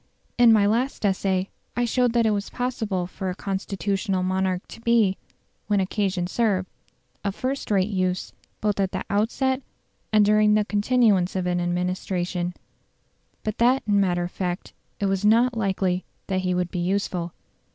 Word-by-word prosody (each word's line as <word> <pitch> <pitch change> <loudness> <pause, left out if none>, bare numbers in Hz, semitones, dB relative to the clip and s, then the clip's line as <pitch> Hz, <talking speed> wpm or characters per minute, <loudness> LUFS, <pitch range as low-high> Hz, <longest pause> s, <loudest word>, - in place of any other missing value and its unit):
In 240 -1 +8
my 215 -2 +5
last 230 +3 0
essay 190 -1 0 0.3
I 245 - +2
showed 245 0 +2
that 235 -1 +3
it 220 - +3
was 200 -1 -2
possible 220 -7 -2
for 185 +1 -5
a 180 - -3
constitutional 195 0 -2
monarch 185 0 -1
to - - -11
be, 230 -5 +3 0.5
when 205 -1 +2
occasion 190 -1 0
served, 190 -2 0 0.6
of 200 -1 -2
first 265 +2 -3
rate 200 0 +2
use 185 -2 -1 0.3
both 210 -1 0
at 195 -1 0
the - - -2
outset 255 +6 +1 0.5
and 210 -1 +5
during 210 0 +4
the 210 -1 +2
continuance 205 -4 +2
of 185 -1 -1
an 180 0 0
administration; 180 0 -2 0.9
but 215 -1 -3
that 250 +3 +4
in 205 -1 +3
matter 175 -3 +1
of 175 - -4
fact 180 -1 -4 0.3
it 200 - 0
was 195 0 0
not 235 +4 +4
likely 190 -4 0 0.2
that 190 -1 -1
he 180 -1 0
would 180 -1 -1
be 180 - -3
useful. 180 -2 -1
195 Hz, 165 wpm, -24 LUFS, 185-220 Hz, 0.9 s, In